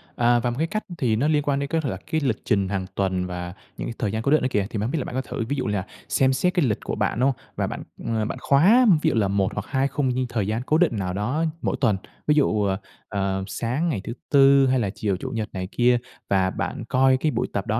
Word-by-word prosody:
À, 120 0 +3
và 120 +1 0
một 120 - -3
cái 160 +3 0
cách 215 +5 -3
thì 120 -7 +1
nó 130 +7 +1
liên 150 -2 +2
quan 140 -1 0
đến 140 - -2
cái 165 +1 +1
lật 125 -9 -2
cái 160 - +1
lịch 130 -6 0
trình 100 -3 +1
hàng 95 -2 -2
tuần 95 -2 0
và 90 -1 -5 0.2
những - - -4
thời 105 -4 0
gian 110 - -2
cố 140 - 0
định 155 - +5
đó - - +1
kìa. 100 -2 +1
Thì - - -4
mình 100 - -1
hông 115 - -1
biết 165 - -1
là - - -2
bạn - - -6
có 130 - +1
thử, 115 -2 -4
ví 145 - 0
dụ 130 - -2
như 105 - -1
là 95 -2 -1 0.2
xem 130 0 +3
xét 180 +8 +1
cái 175 -6 +2
lịch 105 -5 0
của - - -3
bạn, - - -1
đúng 130 - +4
hông? 135 - -1 0.2
Và - - -1
bạn, - - -5 0.2
ờ, 110 -2 0
bạn - - -4
khóa 195 - +5 0.2
ví - - +3
dụ - - -1
là 105 -3 +2
1 95 -1 0
hoặc 105 - -4
2 135 0 +1
khung 135 -2 0 0.2
thời 110 -5 -1
gian 110 +3 -1
cố 155 - +3
định 165 -10 +2
nào 90 -2 -2
đó 125 - -1 0.2
mỗi - - -1
tuần. 110 -6 +3 0.3
Ví 150 - +4
dụ, 110 -8 +2
ờ, 95 -1 +1 0.3
ờ, 95 -1 -1
sáng 125 - -1
ngày 120 -12 -2
thứ 115 - -5 0.2
Tư 140 -1 +6
hay 130 0 +2
là 105 -4 0
chiều 100 -2 -1
Chủ 130 - -5
nhật 115 -3 -3
này 95 -1 -4
kia 120 0 +3 0.3
và 95 -1 +3
bạn - - -4
coi 130 0 +4
cái 155 +3 0
buổi - - -1
tập 100 +2 -2
đó 110 +1 +1
120 Hz, 295 wpm, -24 LUFS, 100-140 Hz, 0.3 s, Tư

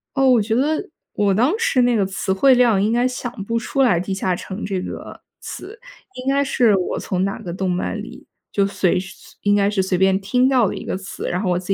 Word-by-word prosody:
哦， 270 -1 +4
我 245 -3 +5
觉 220 +2 -1
得， 310 +9 0 0.3
我 200 -2 +2
当 250 - +2
时 455 - +2
那 245 -1 +3
个 200 -3 +2
词 190 0 -3
汇 260 +8 +5
量 235 -6 +4
应 215 +3 +1
该 245 +1 +2
想 250 -1 -4
不 230 +1 -1
出 270 +4 -1
来 180 -10 +4
地 190 +2 -3
下 185 -1 -1
城 190 +4 -7
这 195 -2 -2
个 - - -8 0.2
词。 430 +5 -9 0.3
应 255 +1 -4
该 280 0 +2
是 240 -6 +3
我 180 - -2
从 185 0 -2
哪 195 +2 -2
个 180 -6 -6
动 185 +1 -2
漫 180 0 -2
里， - - -11 0.2
就 200 -1 +2
随 190 -2 +1
是 190 - -9
随 - - -18
应 205 0 +3
该 200 -1 +3
是 205 -2 +1
随 185 -1 0
便 190 +1 +3
听 250 +6 +2
到 250 -6 +3
的 - - -3
一 - - -7
个 - - -2
词， 195 +1 -6
然 180 +2 -1
后 190 - -1
我 175 - +2
自 185 +2 -1
205 Hz, 270 characters per minute, -20 LUFS, 190-250 Hz, 0.3 s, 我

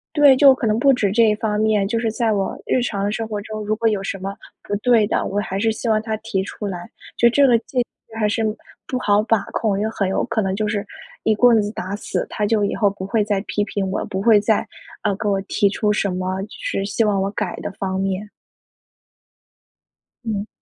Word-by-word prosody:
对， 290 -3 +7
就 275 -1 +7
可 240 - -3
能 215 +1 +2
不 275 +3 +5
止 205 -6 +1
这 230 +1 +5
一 210 -1 +4
方 210 -1 -1
面， 215 -2 +2
就 230 +2 -1
是 225 -1 0
在 225 0 0
我 195 -2 -1
日 255 - +2
常 200 -3 -1
生 225 +1 -3
活 210 -2 -3
中， 215 0 -6
如 215 +1 0
果 230 +1 -1
有 210 -3 -1
什 195 0 -4
么 195 +1 -5 0.3
不 205 - -2
对 220 0 +3
的， - - 0
我 200 - -2
还 195 -2 -3
是 225 0 +2
希 225 +2 -3
望 215 -1 +3
他 220 0 -3
提 190 -3 -2
出 205 +1 -6
来。 175 -3 -6 0.3
就 235 - +5
这 275 +4 +4
个 235 -2 +5
界 250 +2 -6 0.3
限 225 - -10
还 210 - +2
是 225 +2 0 0.4
不 255 - -2
好 205 -2 +3
把 225 -2 +1
控， 205 -3 0
也 215 +2 0
很 200 -3 -1
有 190 - 0
可 220 - -1
能 190 0 -1
就 215 0 -1
是 205 -1 -1 0.4
一 220 - +3
棍 230 0 +5
子 205 0 -2
打 190 0 -5
死， 210 - -3
他 210 - -1
就 215 -1 +2
以 200 - -1
后 205 - +3
不 195 -1 -7
会 215 +1 +1
再 205 -2 0
批 210 - -2
评 200 -1 -3
我， 190 - -2
不 190 +1 -3
会 220 -2 +6
再， 215 +1 +1 0.4
呃， 205 -2 +1
给 215 -1 -2
我 195 -1 +1
提 200 +1 +1
出 210 +1 0
什 205 -1 0
么 185 +1 -2
就 205 - -7
是 - - -2
希 220 +2 0
望 200 -2 +1
我 195 - -1
改 - - -3
的 - - -4
方 190 -1 -3
面。 195 +2 -2 1.9
嗯。 210 -2 -2
210 Hz, 260 characters per minute, -21 LUFS, 200-225 Hz, 1.9 s, 对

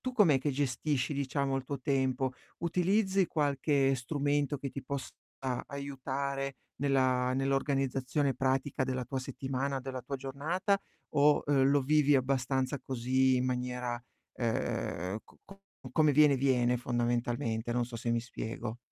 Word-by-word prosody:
tu 255 - -3
com'è 190 - +5
che 145 +3 -1
gestisci 140 +1 0
diciamo 140 -1 -1
il 135 - -3
tuo 140 0 -4
tempo? 130 -1 +1 0.3
Utilizzi 190 +3 +2
qualche 140 -2 +2
strumento 145 +2 0
che 140 0 -4
ti 140 - -6
possa 140 +1 -4 0.6
aiutare 140 0 -3 0.2
nella 130 -2 +2
nell'organizzazione 135 0 0
pratica 135 +1 0
della 130 -1 -2
tua 135 +3 -3
settimana, 135 +1 -2
della 130 0 -5
tua 135 +3 -4
giornata 160 +9 -1 0.3
o, 145 +1 +4
uhm, 140 -2 +3
lo 140 +1 +4
vivi 145 +1 +4
abbastanza 130 +1 0
così 130 +1 +2
in 125 - +1
maniera, 125 -1 -2 0.3
ehm, 105 -5 -2
co - - -22
co 195 0 -14 0.3
come 155 -2 +4
viene 145 -1 +6
viene 125 -2 +2
fondamentalmente, 120 -1 -1
non 120 0 +1
so 120 0 -7
se 115 +1 -2
mi 115 0 +2
spiego? 115 -1 -5
135 Hz, 140 wpm, -31 LUFS, 125-145 Hz, 0.6 s, viene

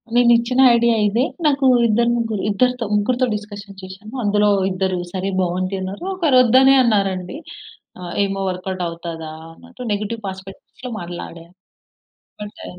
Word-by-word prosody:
నేనేచ్చిన 240 +1 +3 0.2
idea 235 0 +3
ఇదే. 230 +5 +1 0.2
నాకు 280 -2 +2 0.2
ఇద్దరు 235 +2 +2
ముగ్గురు 225 -4 -2
ఇద్దరితో 250 +3 +1
ముగ్గురితో 245 +5 +1
డిస్కషన్ 205 -1 -9
జేశాను. 190 +4 -11
అందులో 205 0 +2 0.2
ఇద్దరు 185 -1 -1
"సరే 190 +1 -2
బాగుంది" 185 +2 -2
అన్నారు. 190 - -6
ఒకరు 320 -9 +2
"ఒద్దనే 260 +3 +5
అన్నారు" 200 -4 +2
అండి. 180 +9 -7 0.6
ఆహ్, 175 -1 -7
"ఏమో 195 0 -4
వర్క్‌ 185 +1 -5
ఔట్ 185 - -4
అవుతదా?" 165 -1 -7 0.2
అన్నట్టు 250 +4 -10
నెగెటివ్ 215 +2 -4
ప్రాస్పె‌క్టివ్‌లో 195 +6 -9
మాట్లాడారు. 170 -1 -9 0.9
అంటే 205 - -11
205 Hz, 135 wpm, -20 LUFS, 185-235 Hz, 0.9 s, ఒద్దనే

